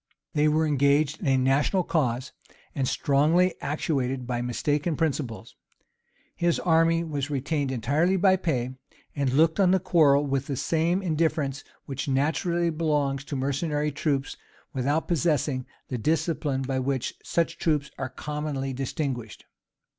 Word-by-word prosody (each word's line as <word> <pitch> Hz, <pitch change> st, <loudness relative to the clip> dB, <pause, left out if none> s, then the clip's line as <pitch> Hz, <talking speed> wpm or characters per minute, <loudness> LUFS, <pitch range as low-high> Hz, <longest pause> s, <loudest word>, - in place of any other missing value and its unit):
They 150 Hz, 0 st, +3 dB
were 155 Hz, +1 st, +2 dB
engaged 145 Hz, +1 st, +2 dB
in 170 Hz, -, -4 dB
a 135 Hz, -1 st, +4 dB
national 140 Hz, +8 st, +2 dB
cause, 130 Hz, -7 st, -1 dB, 0.4 s
and 135 Hz, -2 st, -1 dB
strongly 160 Hz, +7 st, +3 dB
actuated 135 Hz, -3 st, -1 dB
by 120 Hz, -1 st, -2 dB
mistaken 145 Hz, +6 st, -1 dB
principles. 140 Hz, -8 st, -3 dB, 0.8 s
His 170 Hz, -1 st, +1 dB
army 165 Hz, 0 st, +3 dB
was 145 Hz, -3 st, -3 dB
retained 145 Hz, 0 st, -1 dB
entirely 145 Hz, +10 st, +1 dB
by 190 Hz, 0 st, +4 dB
pay, 130 Hz, -9 st, -1 dB, 0.4 s
and 140 Hz, -3 st, 0 dB
looked 160 Hz, +6 st, +3 dB
on 190 Hz, -2 st, +5 dB
the 190 Hz, +1 st, +4 dB
quarrel 155 Hz, -6 st, +4 dB
with 135 Hz, -1 st, -1 dB
the 140 Hz, -, -2 dB
same 165 Hz, +7 st, 0 dB
indifference 155 Hz, -4 st, 0 dB, 0.2 s
which 135 Hz, 0 st, -4 dB
naturally 165 Hz, +5 st, +1 dB
belongs 150 Hz, -4 st, 0 dB
to 145 Hz, -, -5 dB
mercenary 145 Hz, +3 st, -1 dB
troops 140 Hz, -1 st, -1 dB, 0.4 s
without 145 Hz, +4 st, 0 dB
possessing 145 Hz, -5 st, 0 dB, 0.2 s
the 125 Hz, -, -3 dB
discipline 155 Hz, -1 st, 0 dB
by 130 Hz, 0 st, -1 dB
which 130 Hz, -1 st, -1 dB
such 170 Hz, -1 st, -1 dB
troops 150 Hz, -4 st, 0 dB
are 130 Hz, -, -3 dB
commonly 150 Hz, -2 st, -4 dB
distinguished. 130 Hz, -, -4 dB
145 Hz, 140 wpm, -26 LUFS, 135-160 Hz, 0.8 s, on